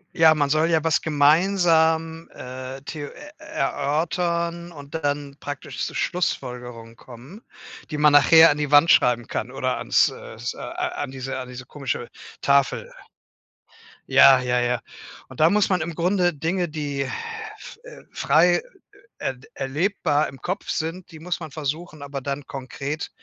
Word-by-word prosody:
Ja, 160 Hz, -1 st, +6 dB
man 145 Hz, -2 st, +1 dB
soll 155 Hz, +3 st, +2 dB
ja 160 Hz, -2 st, +2 dB
was 165 Hz, -1 st, +2 dB
gemeinsam, 160 Hz, +1 st, +2 dB
äh, 130 Hz, +1 st, -8 dB
theo 145 Hz, 0 st, -6 dB
äh, 295 Hz, 0 st, -12 dB
erörtern 170 Hz, +4 st, -2 dB
und 145 Hz, -1 st, -12 dB
dann 145 Hz, -2 st, -3 dB
praktisch 145 Hz, -1 st, -5 dB
zu -, -, -6 dB
Schlussfolgerungen 125 Hz, -9 st, -3 dB
kommen, 130 Hz, -, -13 dB, 0.5 s
die 150 Hz, -, -3 dB
man 150 Hz, 0 st, +5 dB
nachher 160 Hz, +3 st, +8 dB
an 145 Hz, -, -2 dB
die 150 Hz, -1 st, -2 dB
Wand 145 Hz, +3 st, +6 dB
schreiben 120 Hz, -1 st, +3 dB
kann -, -, -4 dB
oder -, -, -2 dB
ans -, -, +3 dB
äh, -, -, -10 dB
s -, -, -5 dB
äh, -, -, -16 dB
an 145 Hz, -, -4 dB
diese 135 Hz, 0 st, -5 dB
an 130 Hz, -, -6 dB
diese 125 Hz, 0 st, -9 dB
komische 135 Hz, -4 st, -4 dB, 0.3 s
Tafel. 140 Hz, -1 st, +2 dB, 1.2 s
Ja, 135 Hz, -1 st, +7 dB
ja, 125 Hz, 0 st, +1 dB
ja. 120 Hz, -1 st, 0 dB, 0.5 s
Und 130 Hz, -, -12 dB
da 160 Hz, +2 st, +6 dB
muss 205 Hz, -1 st, +2 dB
man 185 Hz, -3 st, +1 dB
im 165 Hz, 0 st, -4 dB
Grunde 180 Hz, 0 st, +1 dB
Dinge 170 Hz, +5 st, -1 dB
die, 145 Hz, -3 st, -4 dB, 0.8 s
äh, -, -, -12 dB
frei 165 Hz, +5 st, +3 dB, 0.6 s
er 130 Hz, -, -3 dB, 0.2 s
erlebbar 150 Hz, +2 st, 0 dB
im 135 Hz, -, -12 dB
Kopf 185 Hz, +3 st, -4 dB
sind 165 Hz, +3 st, -3 dB
die 160 Hz, -, -11 dB
muss 175 Hz, +2 st, -3 dB
man 160 Hz, -3 st, -7 dB
versuchen 155 Hz, +1 st, -5 dB
aber 140 Hz, -1 st, -5 dB
dann 140 Hz, +1 st, -4 dB
konkret 140 Hz, +3 st, -5 dB
150 Hz, 155 wpm, -23 LUFS, 135-165 Hz, 1.2 s, nachher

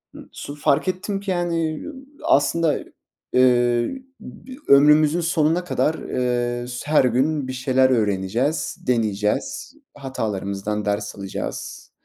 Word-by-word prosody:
Im -, -, -12 dB
su 145 Hz, -, -8 dB
fark 145 Hz, +4 st, +1 dB
ettim 195 Hz, +2 st, -2 dB
ki, 200 Hz, -1 st, -4 dB
yani, 165 Hz, -3 st, -1 dB, 0.4 s
aslında, 155 Hz, +2 st, +2 dB, 0.5 s
eee, 120 Hz, -, +3 dB, 0.2 s
bi 260 Hz, 0 st, -11 dB
ömrümüzün 150 Hz, +4 st, +6 dB
sonuna 165 Hz, +1 st, +1 dB
kadar, 160 Hz, -2 st, 0 dB
eee, 120 Hz, -1 st, -2 dB
s 125 Hz, +3 st, -7 dB
her 155 Hz, -, +5 dB
gün 135 Hz, +3 st, +1 dB
bir 130 Hz, -, -4 dB
şeyler 130 Hz, 0 st, +2 dB
öğreneceğiz, 115 Hz, -, 0 dB
deneyeceğiz, 110 Hz, -, -1 dB, 0.2 s
hatalarımızdan 105 Hz, -6 st, -3 dB
ders 105 Hz, 0 st, -2 dB
alacağız 100 Hz, -1 st, -6 dB
130 Hz, 115 wpm, -22 LUFS, 120-160 Hz, 0.5 s, ömrümüzün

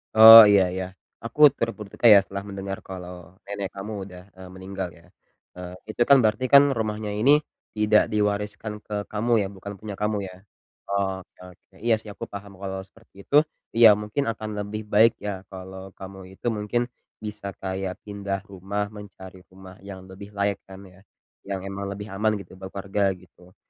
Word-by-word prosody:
Oh, 110 Hz, 0 st, +12 dB
iya 100 Hz, -2 st, +5 dB
iya. 95 Hz, 0 st, -3 dB, 0.4 s
Aku 115 Hz, +5 st, -8 dB, 0.2 s
turut 115 Hz, 0 st, -1 dB
berduka 105 Hz, +2 st, -11 dB
ya 100 Hz, -, +9 dB
setelah 100 Hz, 0 st, -6 dB
mendengar 95 Hz, 0 st, -5 dB
kalau 90 Hz, -1 st, -10 dB
nenek 100 Hz, -1 st, -5 dB
kamu 100 Hz, +2 st, -6 dB
udah, 90 Hz, -2 st, -11 dB
eee, 95 Hz, -1 st, -12 dB
meninggal 95 Hz, 0 st, -6 dB
ya. -, -, -22 dB, 0.5 s
Eee, 90 Hz, 0 st, -8 dB
itu 110 Hz, -, -5 dB
kan 140 Hz, -, +8 dB
berarti 110 Hz, +4 st, +1 dB
kan 140 Hz, -, +10 dB
rumahnya 110 Hz, -2 st, -3 dB
ini 140 Hz, +8 st, +5 dB, 0.3 s
tidak 105 Hz, 0 st, +3 dB
diwariskan 105 Hz, 0 st, -1 dB
ke 105 Hz, -1 st, -5 dB
kamu 110 Hz, +3 st, -2 dB
ya? -, -, -3 dB
Bukan 100 Hz, +2 st, -8 dB
punya 105 Hz, -2 st, -7 dB
kamu 105 Hz, +1 st, -1 dB
ya? 90 Hz, -, -11 dB, 0.6 s
Oh 95 Hz, -2 st, -1 dB
oke -, -, -39 dB, 0.2 s
oke, -, -, -52 dB
iya 115 Hz, +1 st, +2 dB
sih, 110 Hz, -1 st, -7 dB
aku -, -, -8 dB
paham 100 Hz, -1 st, -10 dB
kalau 95 Hz, -1 st, -5 dB
seperti 100 Hz, -1 st, -18 dB
itu, 145 Hz, -, -2 dB, 0.4 s
iya 115 Hz, -3 st, +8 dB
mungkin 105 Hz, +7 st, -2 dB
akan 110 Hz, -1 st, -4 dB
lebih 105 Hz, +1 st, -4 dB
baik 110 Hz, +2 st, +6 dB
ya 95 Hz, -2 st, -5 dB
kalau 95 Hz, 0 st, -10 dB
kamu 95 Hz, 0 st, -10 dB, 0.2 s
itu 120 Hz, -, -6 dB
mungkin 105 Hz, +2 st, -1 dB, 0.4 s
bisa 105 Hz, -1 st, -6 dB
kayak 95 Hz, -1 st, -4 dB
pindah 100 Hz, -1 st, -5 dB
rumah 100 Hz, +2 st, -4 dB
mencari 95 Hz, -3 st, -12 dB
rumah 95 Hz, 0 st, -14 dB
yang 95 Hz, -1 st, -10 dB
lebih 100 Hz, +2 st, -12 dB
layak 100 Hz, 0 st, 0 dB
kan 95 Hz, 0 st, -12 dB
ya, 95 Hz, -1 st, -17 dB, 0.5 s
yang 95 Hz, -1 st, -4 dB
emang 100 Hz, 0 st, -5 dB
lebih 105 Hz, +1 st, -8 dB
aman 105 Hz, +2 st, 0 dB
gitu 95 Hz, -2 st, -10 dB
buat 95 Hz, -, -7 dB
keluarga 100 Hz, 0 st, 0 dB
gitu. 90 Hz, 0 st, -20 dB
100 Hz, 180 wpm, -24 LUFS, 95-105 Hz, 0.6 s, Oh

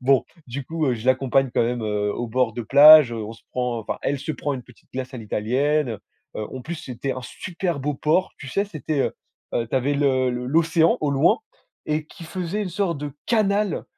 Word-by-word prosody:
Bon, 130 Hz, +1 st, +3 dB, 0.2 s
du 130 Hz, +3 st, -5 dB
coup, 160 Hz, 0 st, -2 dB
heu, 130 Hz, -, +2 dB
je 115 Hz, +2 st, -8 dB
l'accompagne 130 Hz, 0 st, +2 dB
quand -, -, +3 dB
même, 120 Hz, 0 st, -1 dB
heu, 105 Hz, -1 st, -1 dB
au 120 Hz, -, -3 dB
bord 120 Hz, 0 st, +1 dB
de 120 Hz, -, -3 dB
plage, 145 Hz, +2 st, +8 dB
on 110 Hz, -1 st, -5 dB
se 115 Hz, -, -16 dB
prend 125 Hz, -2 st, -1 dB
enfin 110 Hz, -, -4 dB
elle 145 Hz, -, 0 dB
se 145 Hz, +4 st, -4 dB
prend, 145 Hz, -1 st, -3 dB
une 125 Hz, -, -6 dB
petite 125 Hz, -1 st, -21 dB
glace 130 Hz, 0 st, -5 dB
à -, -, -5 dB
l'italienne. 125 Hz, +7 st, 0 dB
Heu 110 Hz, -, -5 dB, 0.4 s
heu, 105 Hz, -, -3 dB
en 130 Hz, -, -7 dB
plus 170 Hz, +6 st, -5 dB
c'était 135 Hz, -2 st, -4 dB
un 130 Hz, -, -6 dB
super 170 Hz, +4 st, -4 dB
beau 145 Hz, +2 st, -1 dB
port, 155 Hz, +7 st, +1 dB
tu 135 Hz, -, -8 dB
sais 200 Hz, +10 st, 0 dB
c'était, 155 Hz, -6 st, -3 dB
heu -, -, 0 dB, 0.4 s
heu, 115 Hz, -, 0 dB
tu 130 Hz, -, 0 dB
avais 135 Hz, +3 st, +1 dB
le 130 Hz, -3 st, +2 dB
le 125 Hz, 0 st, -4 dB
l'océan 165 Hz, +3 st, +3 dB
au 150 Hz, -2 st, 0 dB
loin 135 Hz, -1 st, +3 dB, 0.5 s
et 150 Hz, 0 st, -1 dB
qui 170 Hz, -, -12 dB
faisait 185 Hz, +4 st, -3 dB
une 200 Hz, -, -3 dB
sorte 180 Hz, -2 st, -1 dB
de 145 Hz, 0 st, -5 dB
canal, 210 Hz, -3 st, +1 dB
135 Hz, 230 wpm, -23 LUFS, 125-155 Hz, 0.5 s, plage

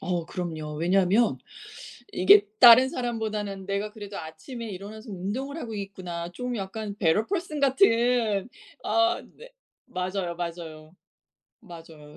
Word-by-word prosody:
어 175 Hz, -2 st, -2 dB
그럼요. 160 Hz, -4 st, -5 dB
왜냐하면 185 Hz, +7 st, +2 dB, 0.7 s
이게 200 Hz, +3 st, +6 dB
'다른 245 Hz, +2 st, +9 dB
사람보다는 215 Hz, -5 st, -3 dB
내가 200 Hz, +2 st, -2 dB
그래도 205 Hz, -2 st, -8 dB
아침에 190 Hz, +10 st, -8 dB
일어나서 210 Hz, +4 st, -9 dB
운동을 215 Hz, -, -4 dB
하고 230 Hz, -8 st, -6 dB
있구나.' 185 Hz, -4 st, -6 dB
좀 250 Hz, +6 st, -4 dB
약간 205 Hz, +1 st, -5 dB
better 190 Hz, +4 st, +2 dB
person 345 Hz, -6 st, -3 dB
같은 240 Hz, -, +3 dB, 0.4 s
아 345 Hz, +1 st, +2 dB
네. -, -, -13 dB, 0.4 s
맞아요, 180 Hz, -1 st, -3 dB
맞아요. 165 Hz, -2 st, -7 dB, 0.7 s
맞아요. 165 Hz, -6 st, -13 dB
200 Hz, 320 characters per minute, -26 LUFS, 175-235 Hz, 0.7 s, 다른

